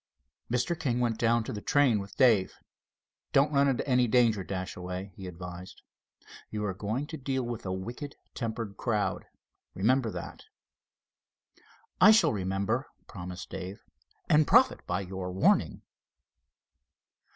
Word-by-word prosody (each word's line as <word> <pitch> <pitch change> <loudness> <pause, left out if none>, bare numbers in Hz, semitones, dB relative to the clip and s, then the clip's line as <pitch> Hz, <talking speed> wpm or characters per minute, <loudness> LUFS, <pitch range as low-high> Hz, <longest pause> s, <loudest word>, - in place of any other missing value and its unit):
Mr. 125 +8 0
King 125 -6 0
went 120 -2 0
down 115 0 +3
to 130 - -5
the 105 - -5
train 135 -5 +3
with 100 0 -9
Dave. 115 -8 +4 0.8
"Don't 140 +2 +4
run 140 0 +4
into 135 0 0
any 125 -2 +3
danger, 115 -4 +3
Dashaway," 90 0 -5
he 95 - -8
advised. 90 +1 -9 0.7
"You 105 -1 -3
are 95 - -1
going 110 +9 -3
to 160 +1 -7
deal 130 -1 -2
with 120 -4 -5
a - - -2
wicked 120 +10 -6 0.2
tempered 115 -4 -4
crowd, 105 -3 -1 0.5
remember 120 +5 +2
that." - - -8 1.6
"I 195 - +9
shall 220 - +5
remember," 100 +6 -1 0.2
promised 90 -1 -8
Dave; 95 +3 -7 0.4
"and 150 -1 +4
profit - - +4
by 90 +2 -1
your 95 -1 -5
warning." 95 +1 +2
110 Hz, 135 wpm, -29 LUFS, 95-130 Hz, 1.6 s, I